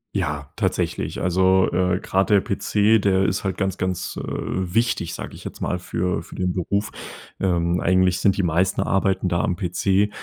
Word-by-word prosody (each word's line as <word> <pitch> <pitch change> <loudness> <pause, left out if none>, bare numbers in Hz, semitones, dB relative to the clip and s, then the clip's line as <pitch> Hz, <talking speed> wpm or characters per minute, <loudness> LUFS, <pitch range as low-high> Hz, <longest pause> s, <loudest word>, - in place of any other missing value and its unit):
Ja, 75 -1 -2
tatsächlich. - - -2
Also, 95 +1 +3
äh, 90 +1 +1
grad 95 +2 0
PC, 105 +2 +2
der 95 -1 +2
ist 95 +2 -1
halt 95 -1 -2
ganz, 95 -1 -1
ganz, 95 -1 -3
äh, - - -3
wichtig, 95 -1 -1
sage - - -7
ich - - -12
jetzt - - -8
mal 90 - -1
für 90 -1 -2
für - - -12
den 90 -1 -1
Beruf. 100 +3 -1 0.5
Ähm, 85 -2 +1
eigentlich 95 0 +3
sind 100 +1 +2
die 100 - +1
meisten 90 +3 +1
Arbeiten 95 -1 +1
da 85 -1 +1
am 90 - 0
PC. 95 +3 +1
95 Hz, 175 wpm, -22 LUFS, 90-95 Hz, 0.5 s, Also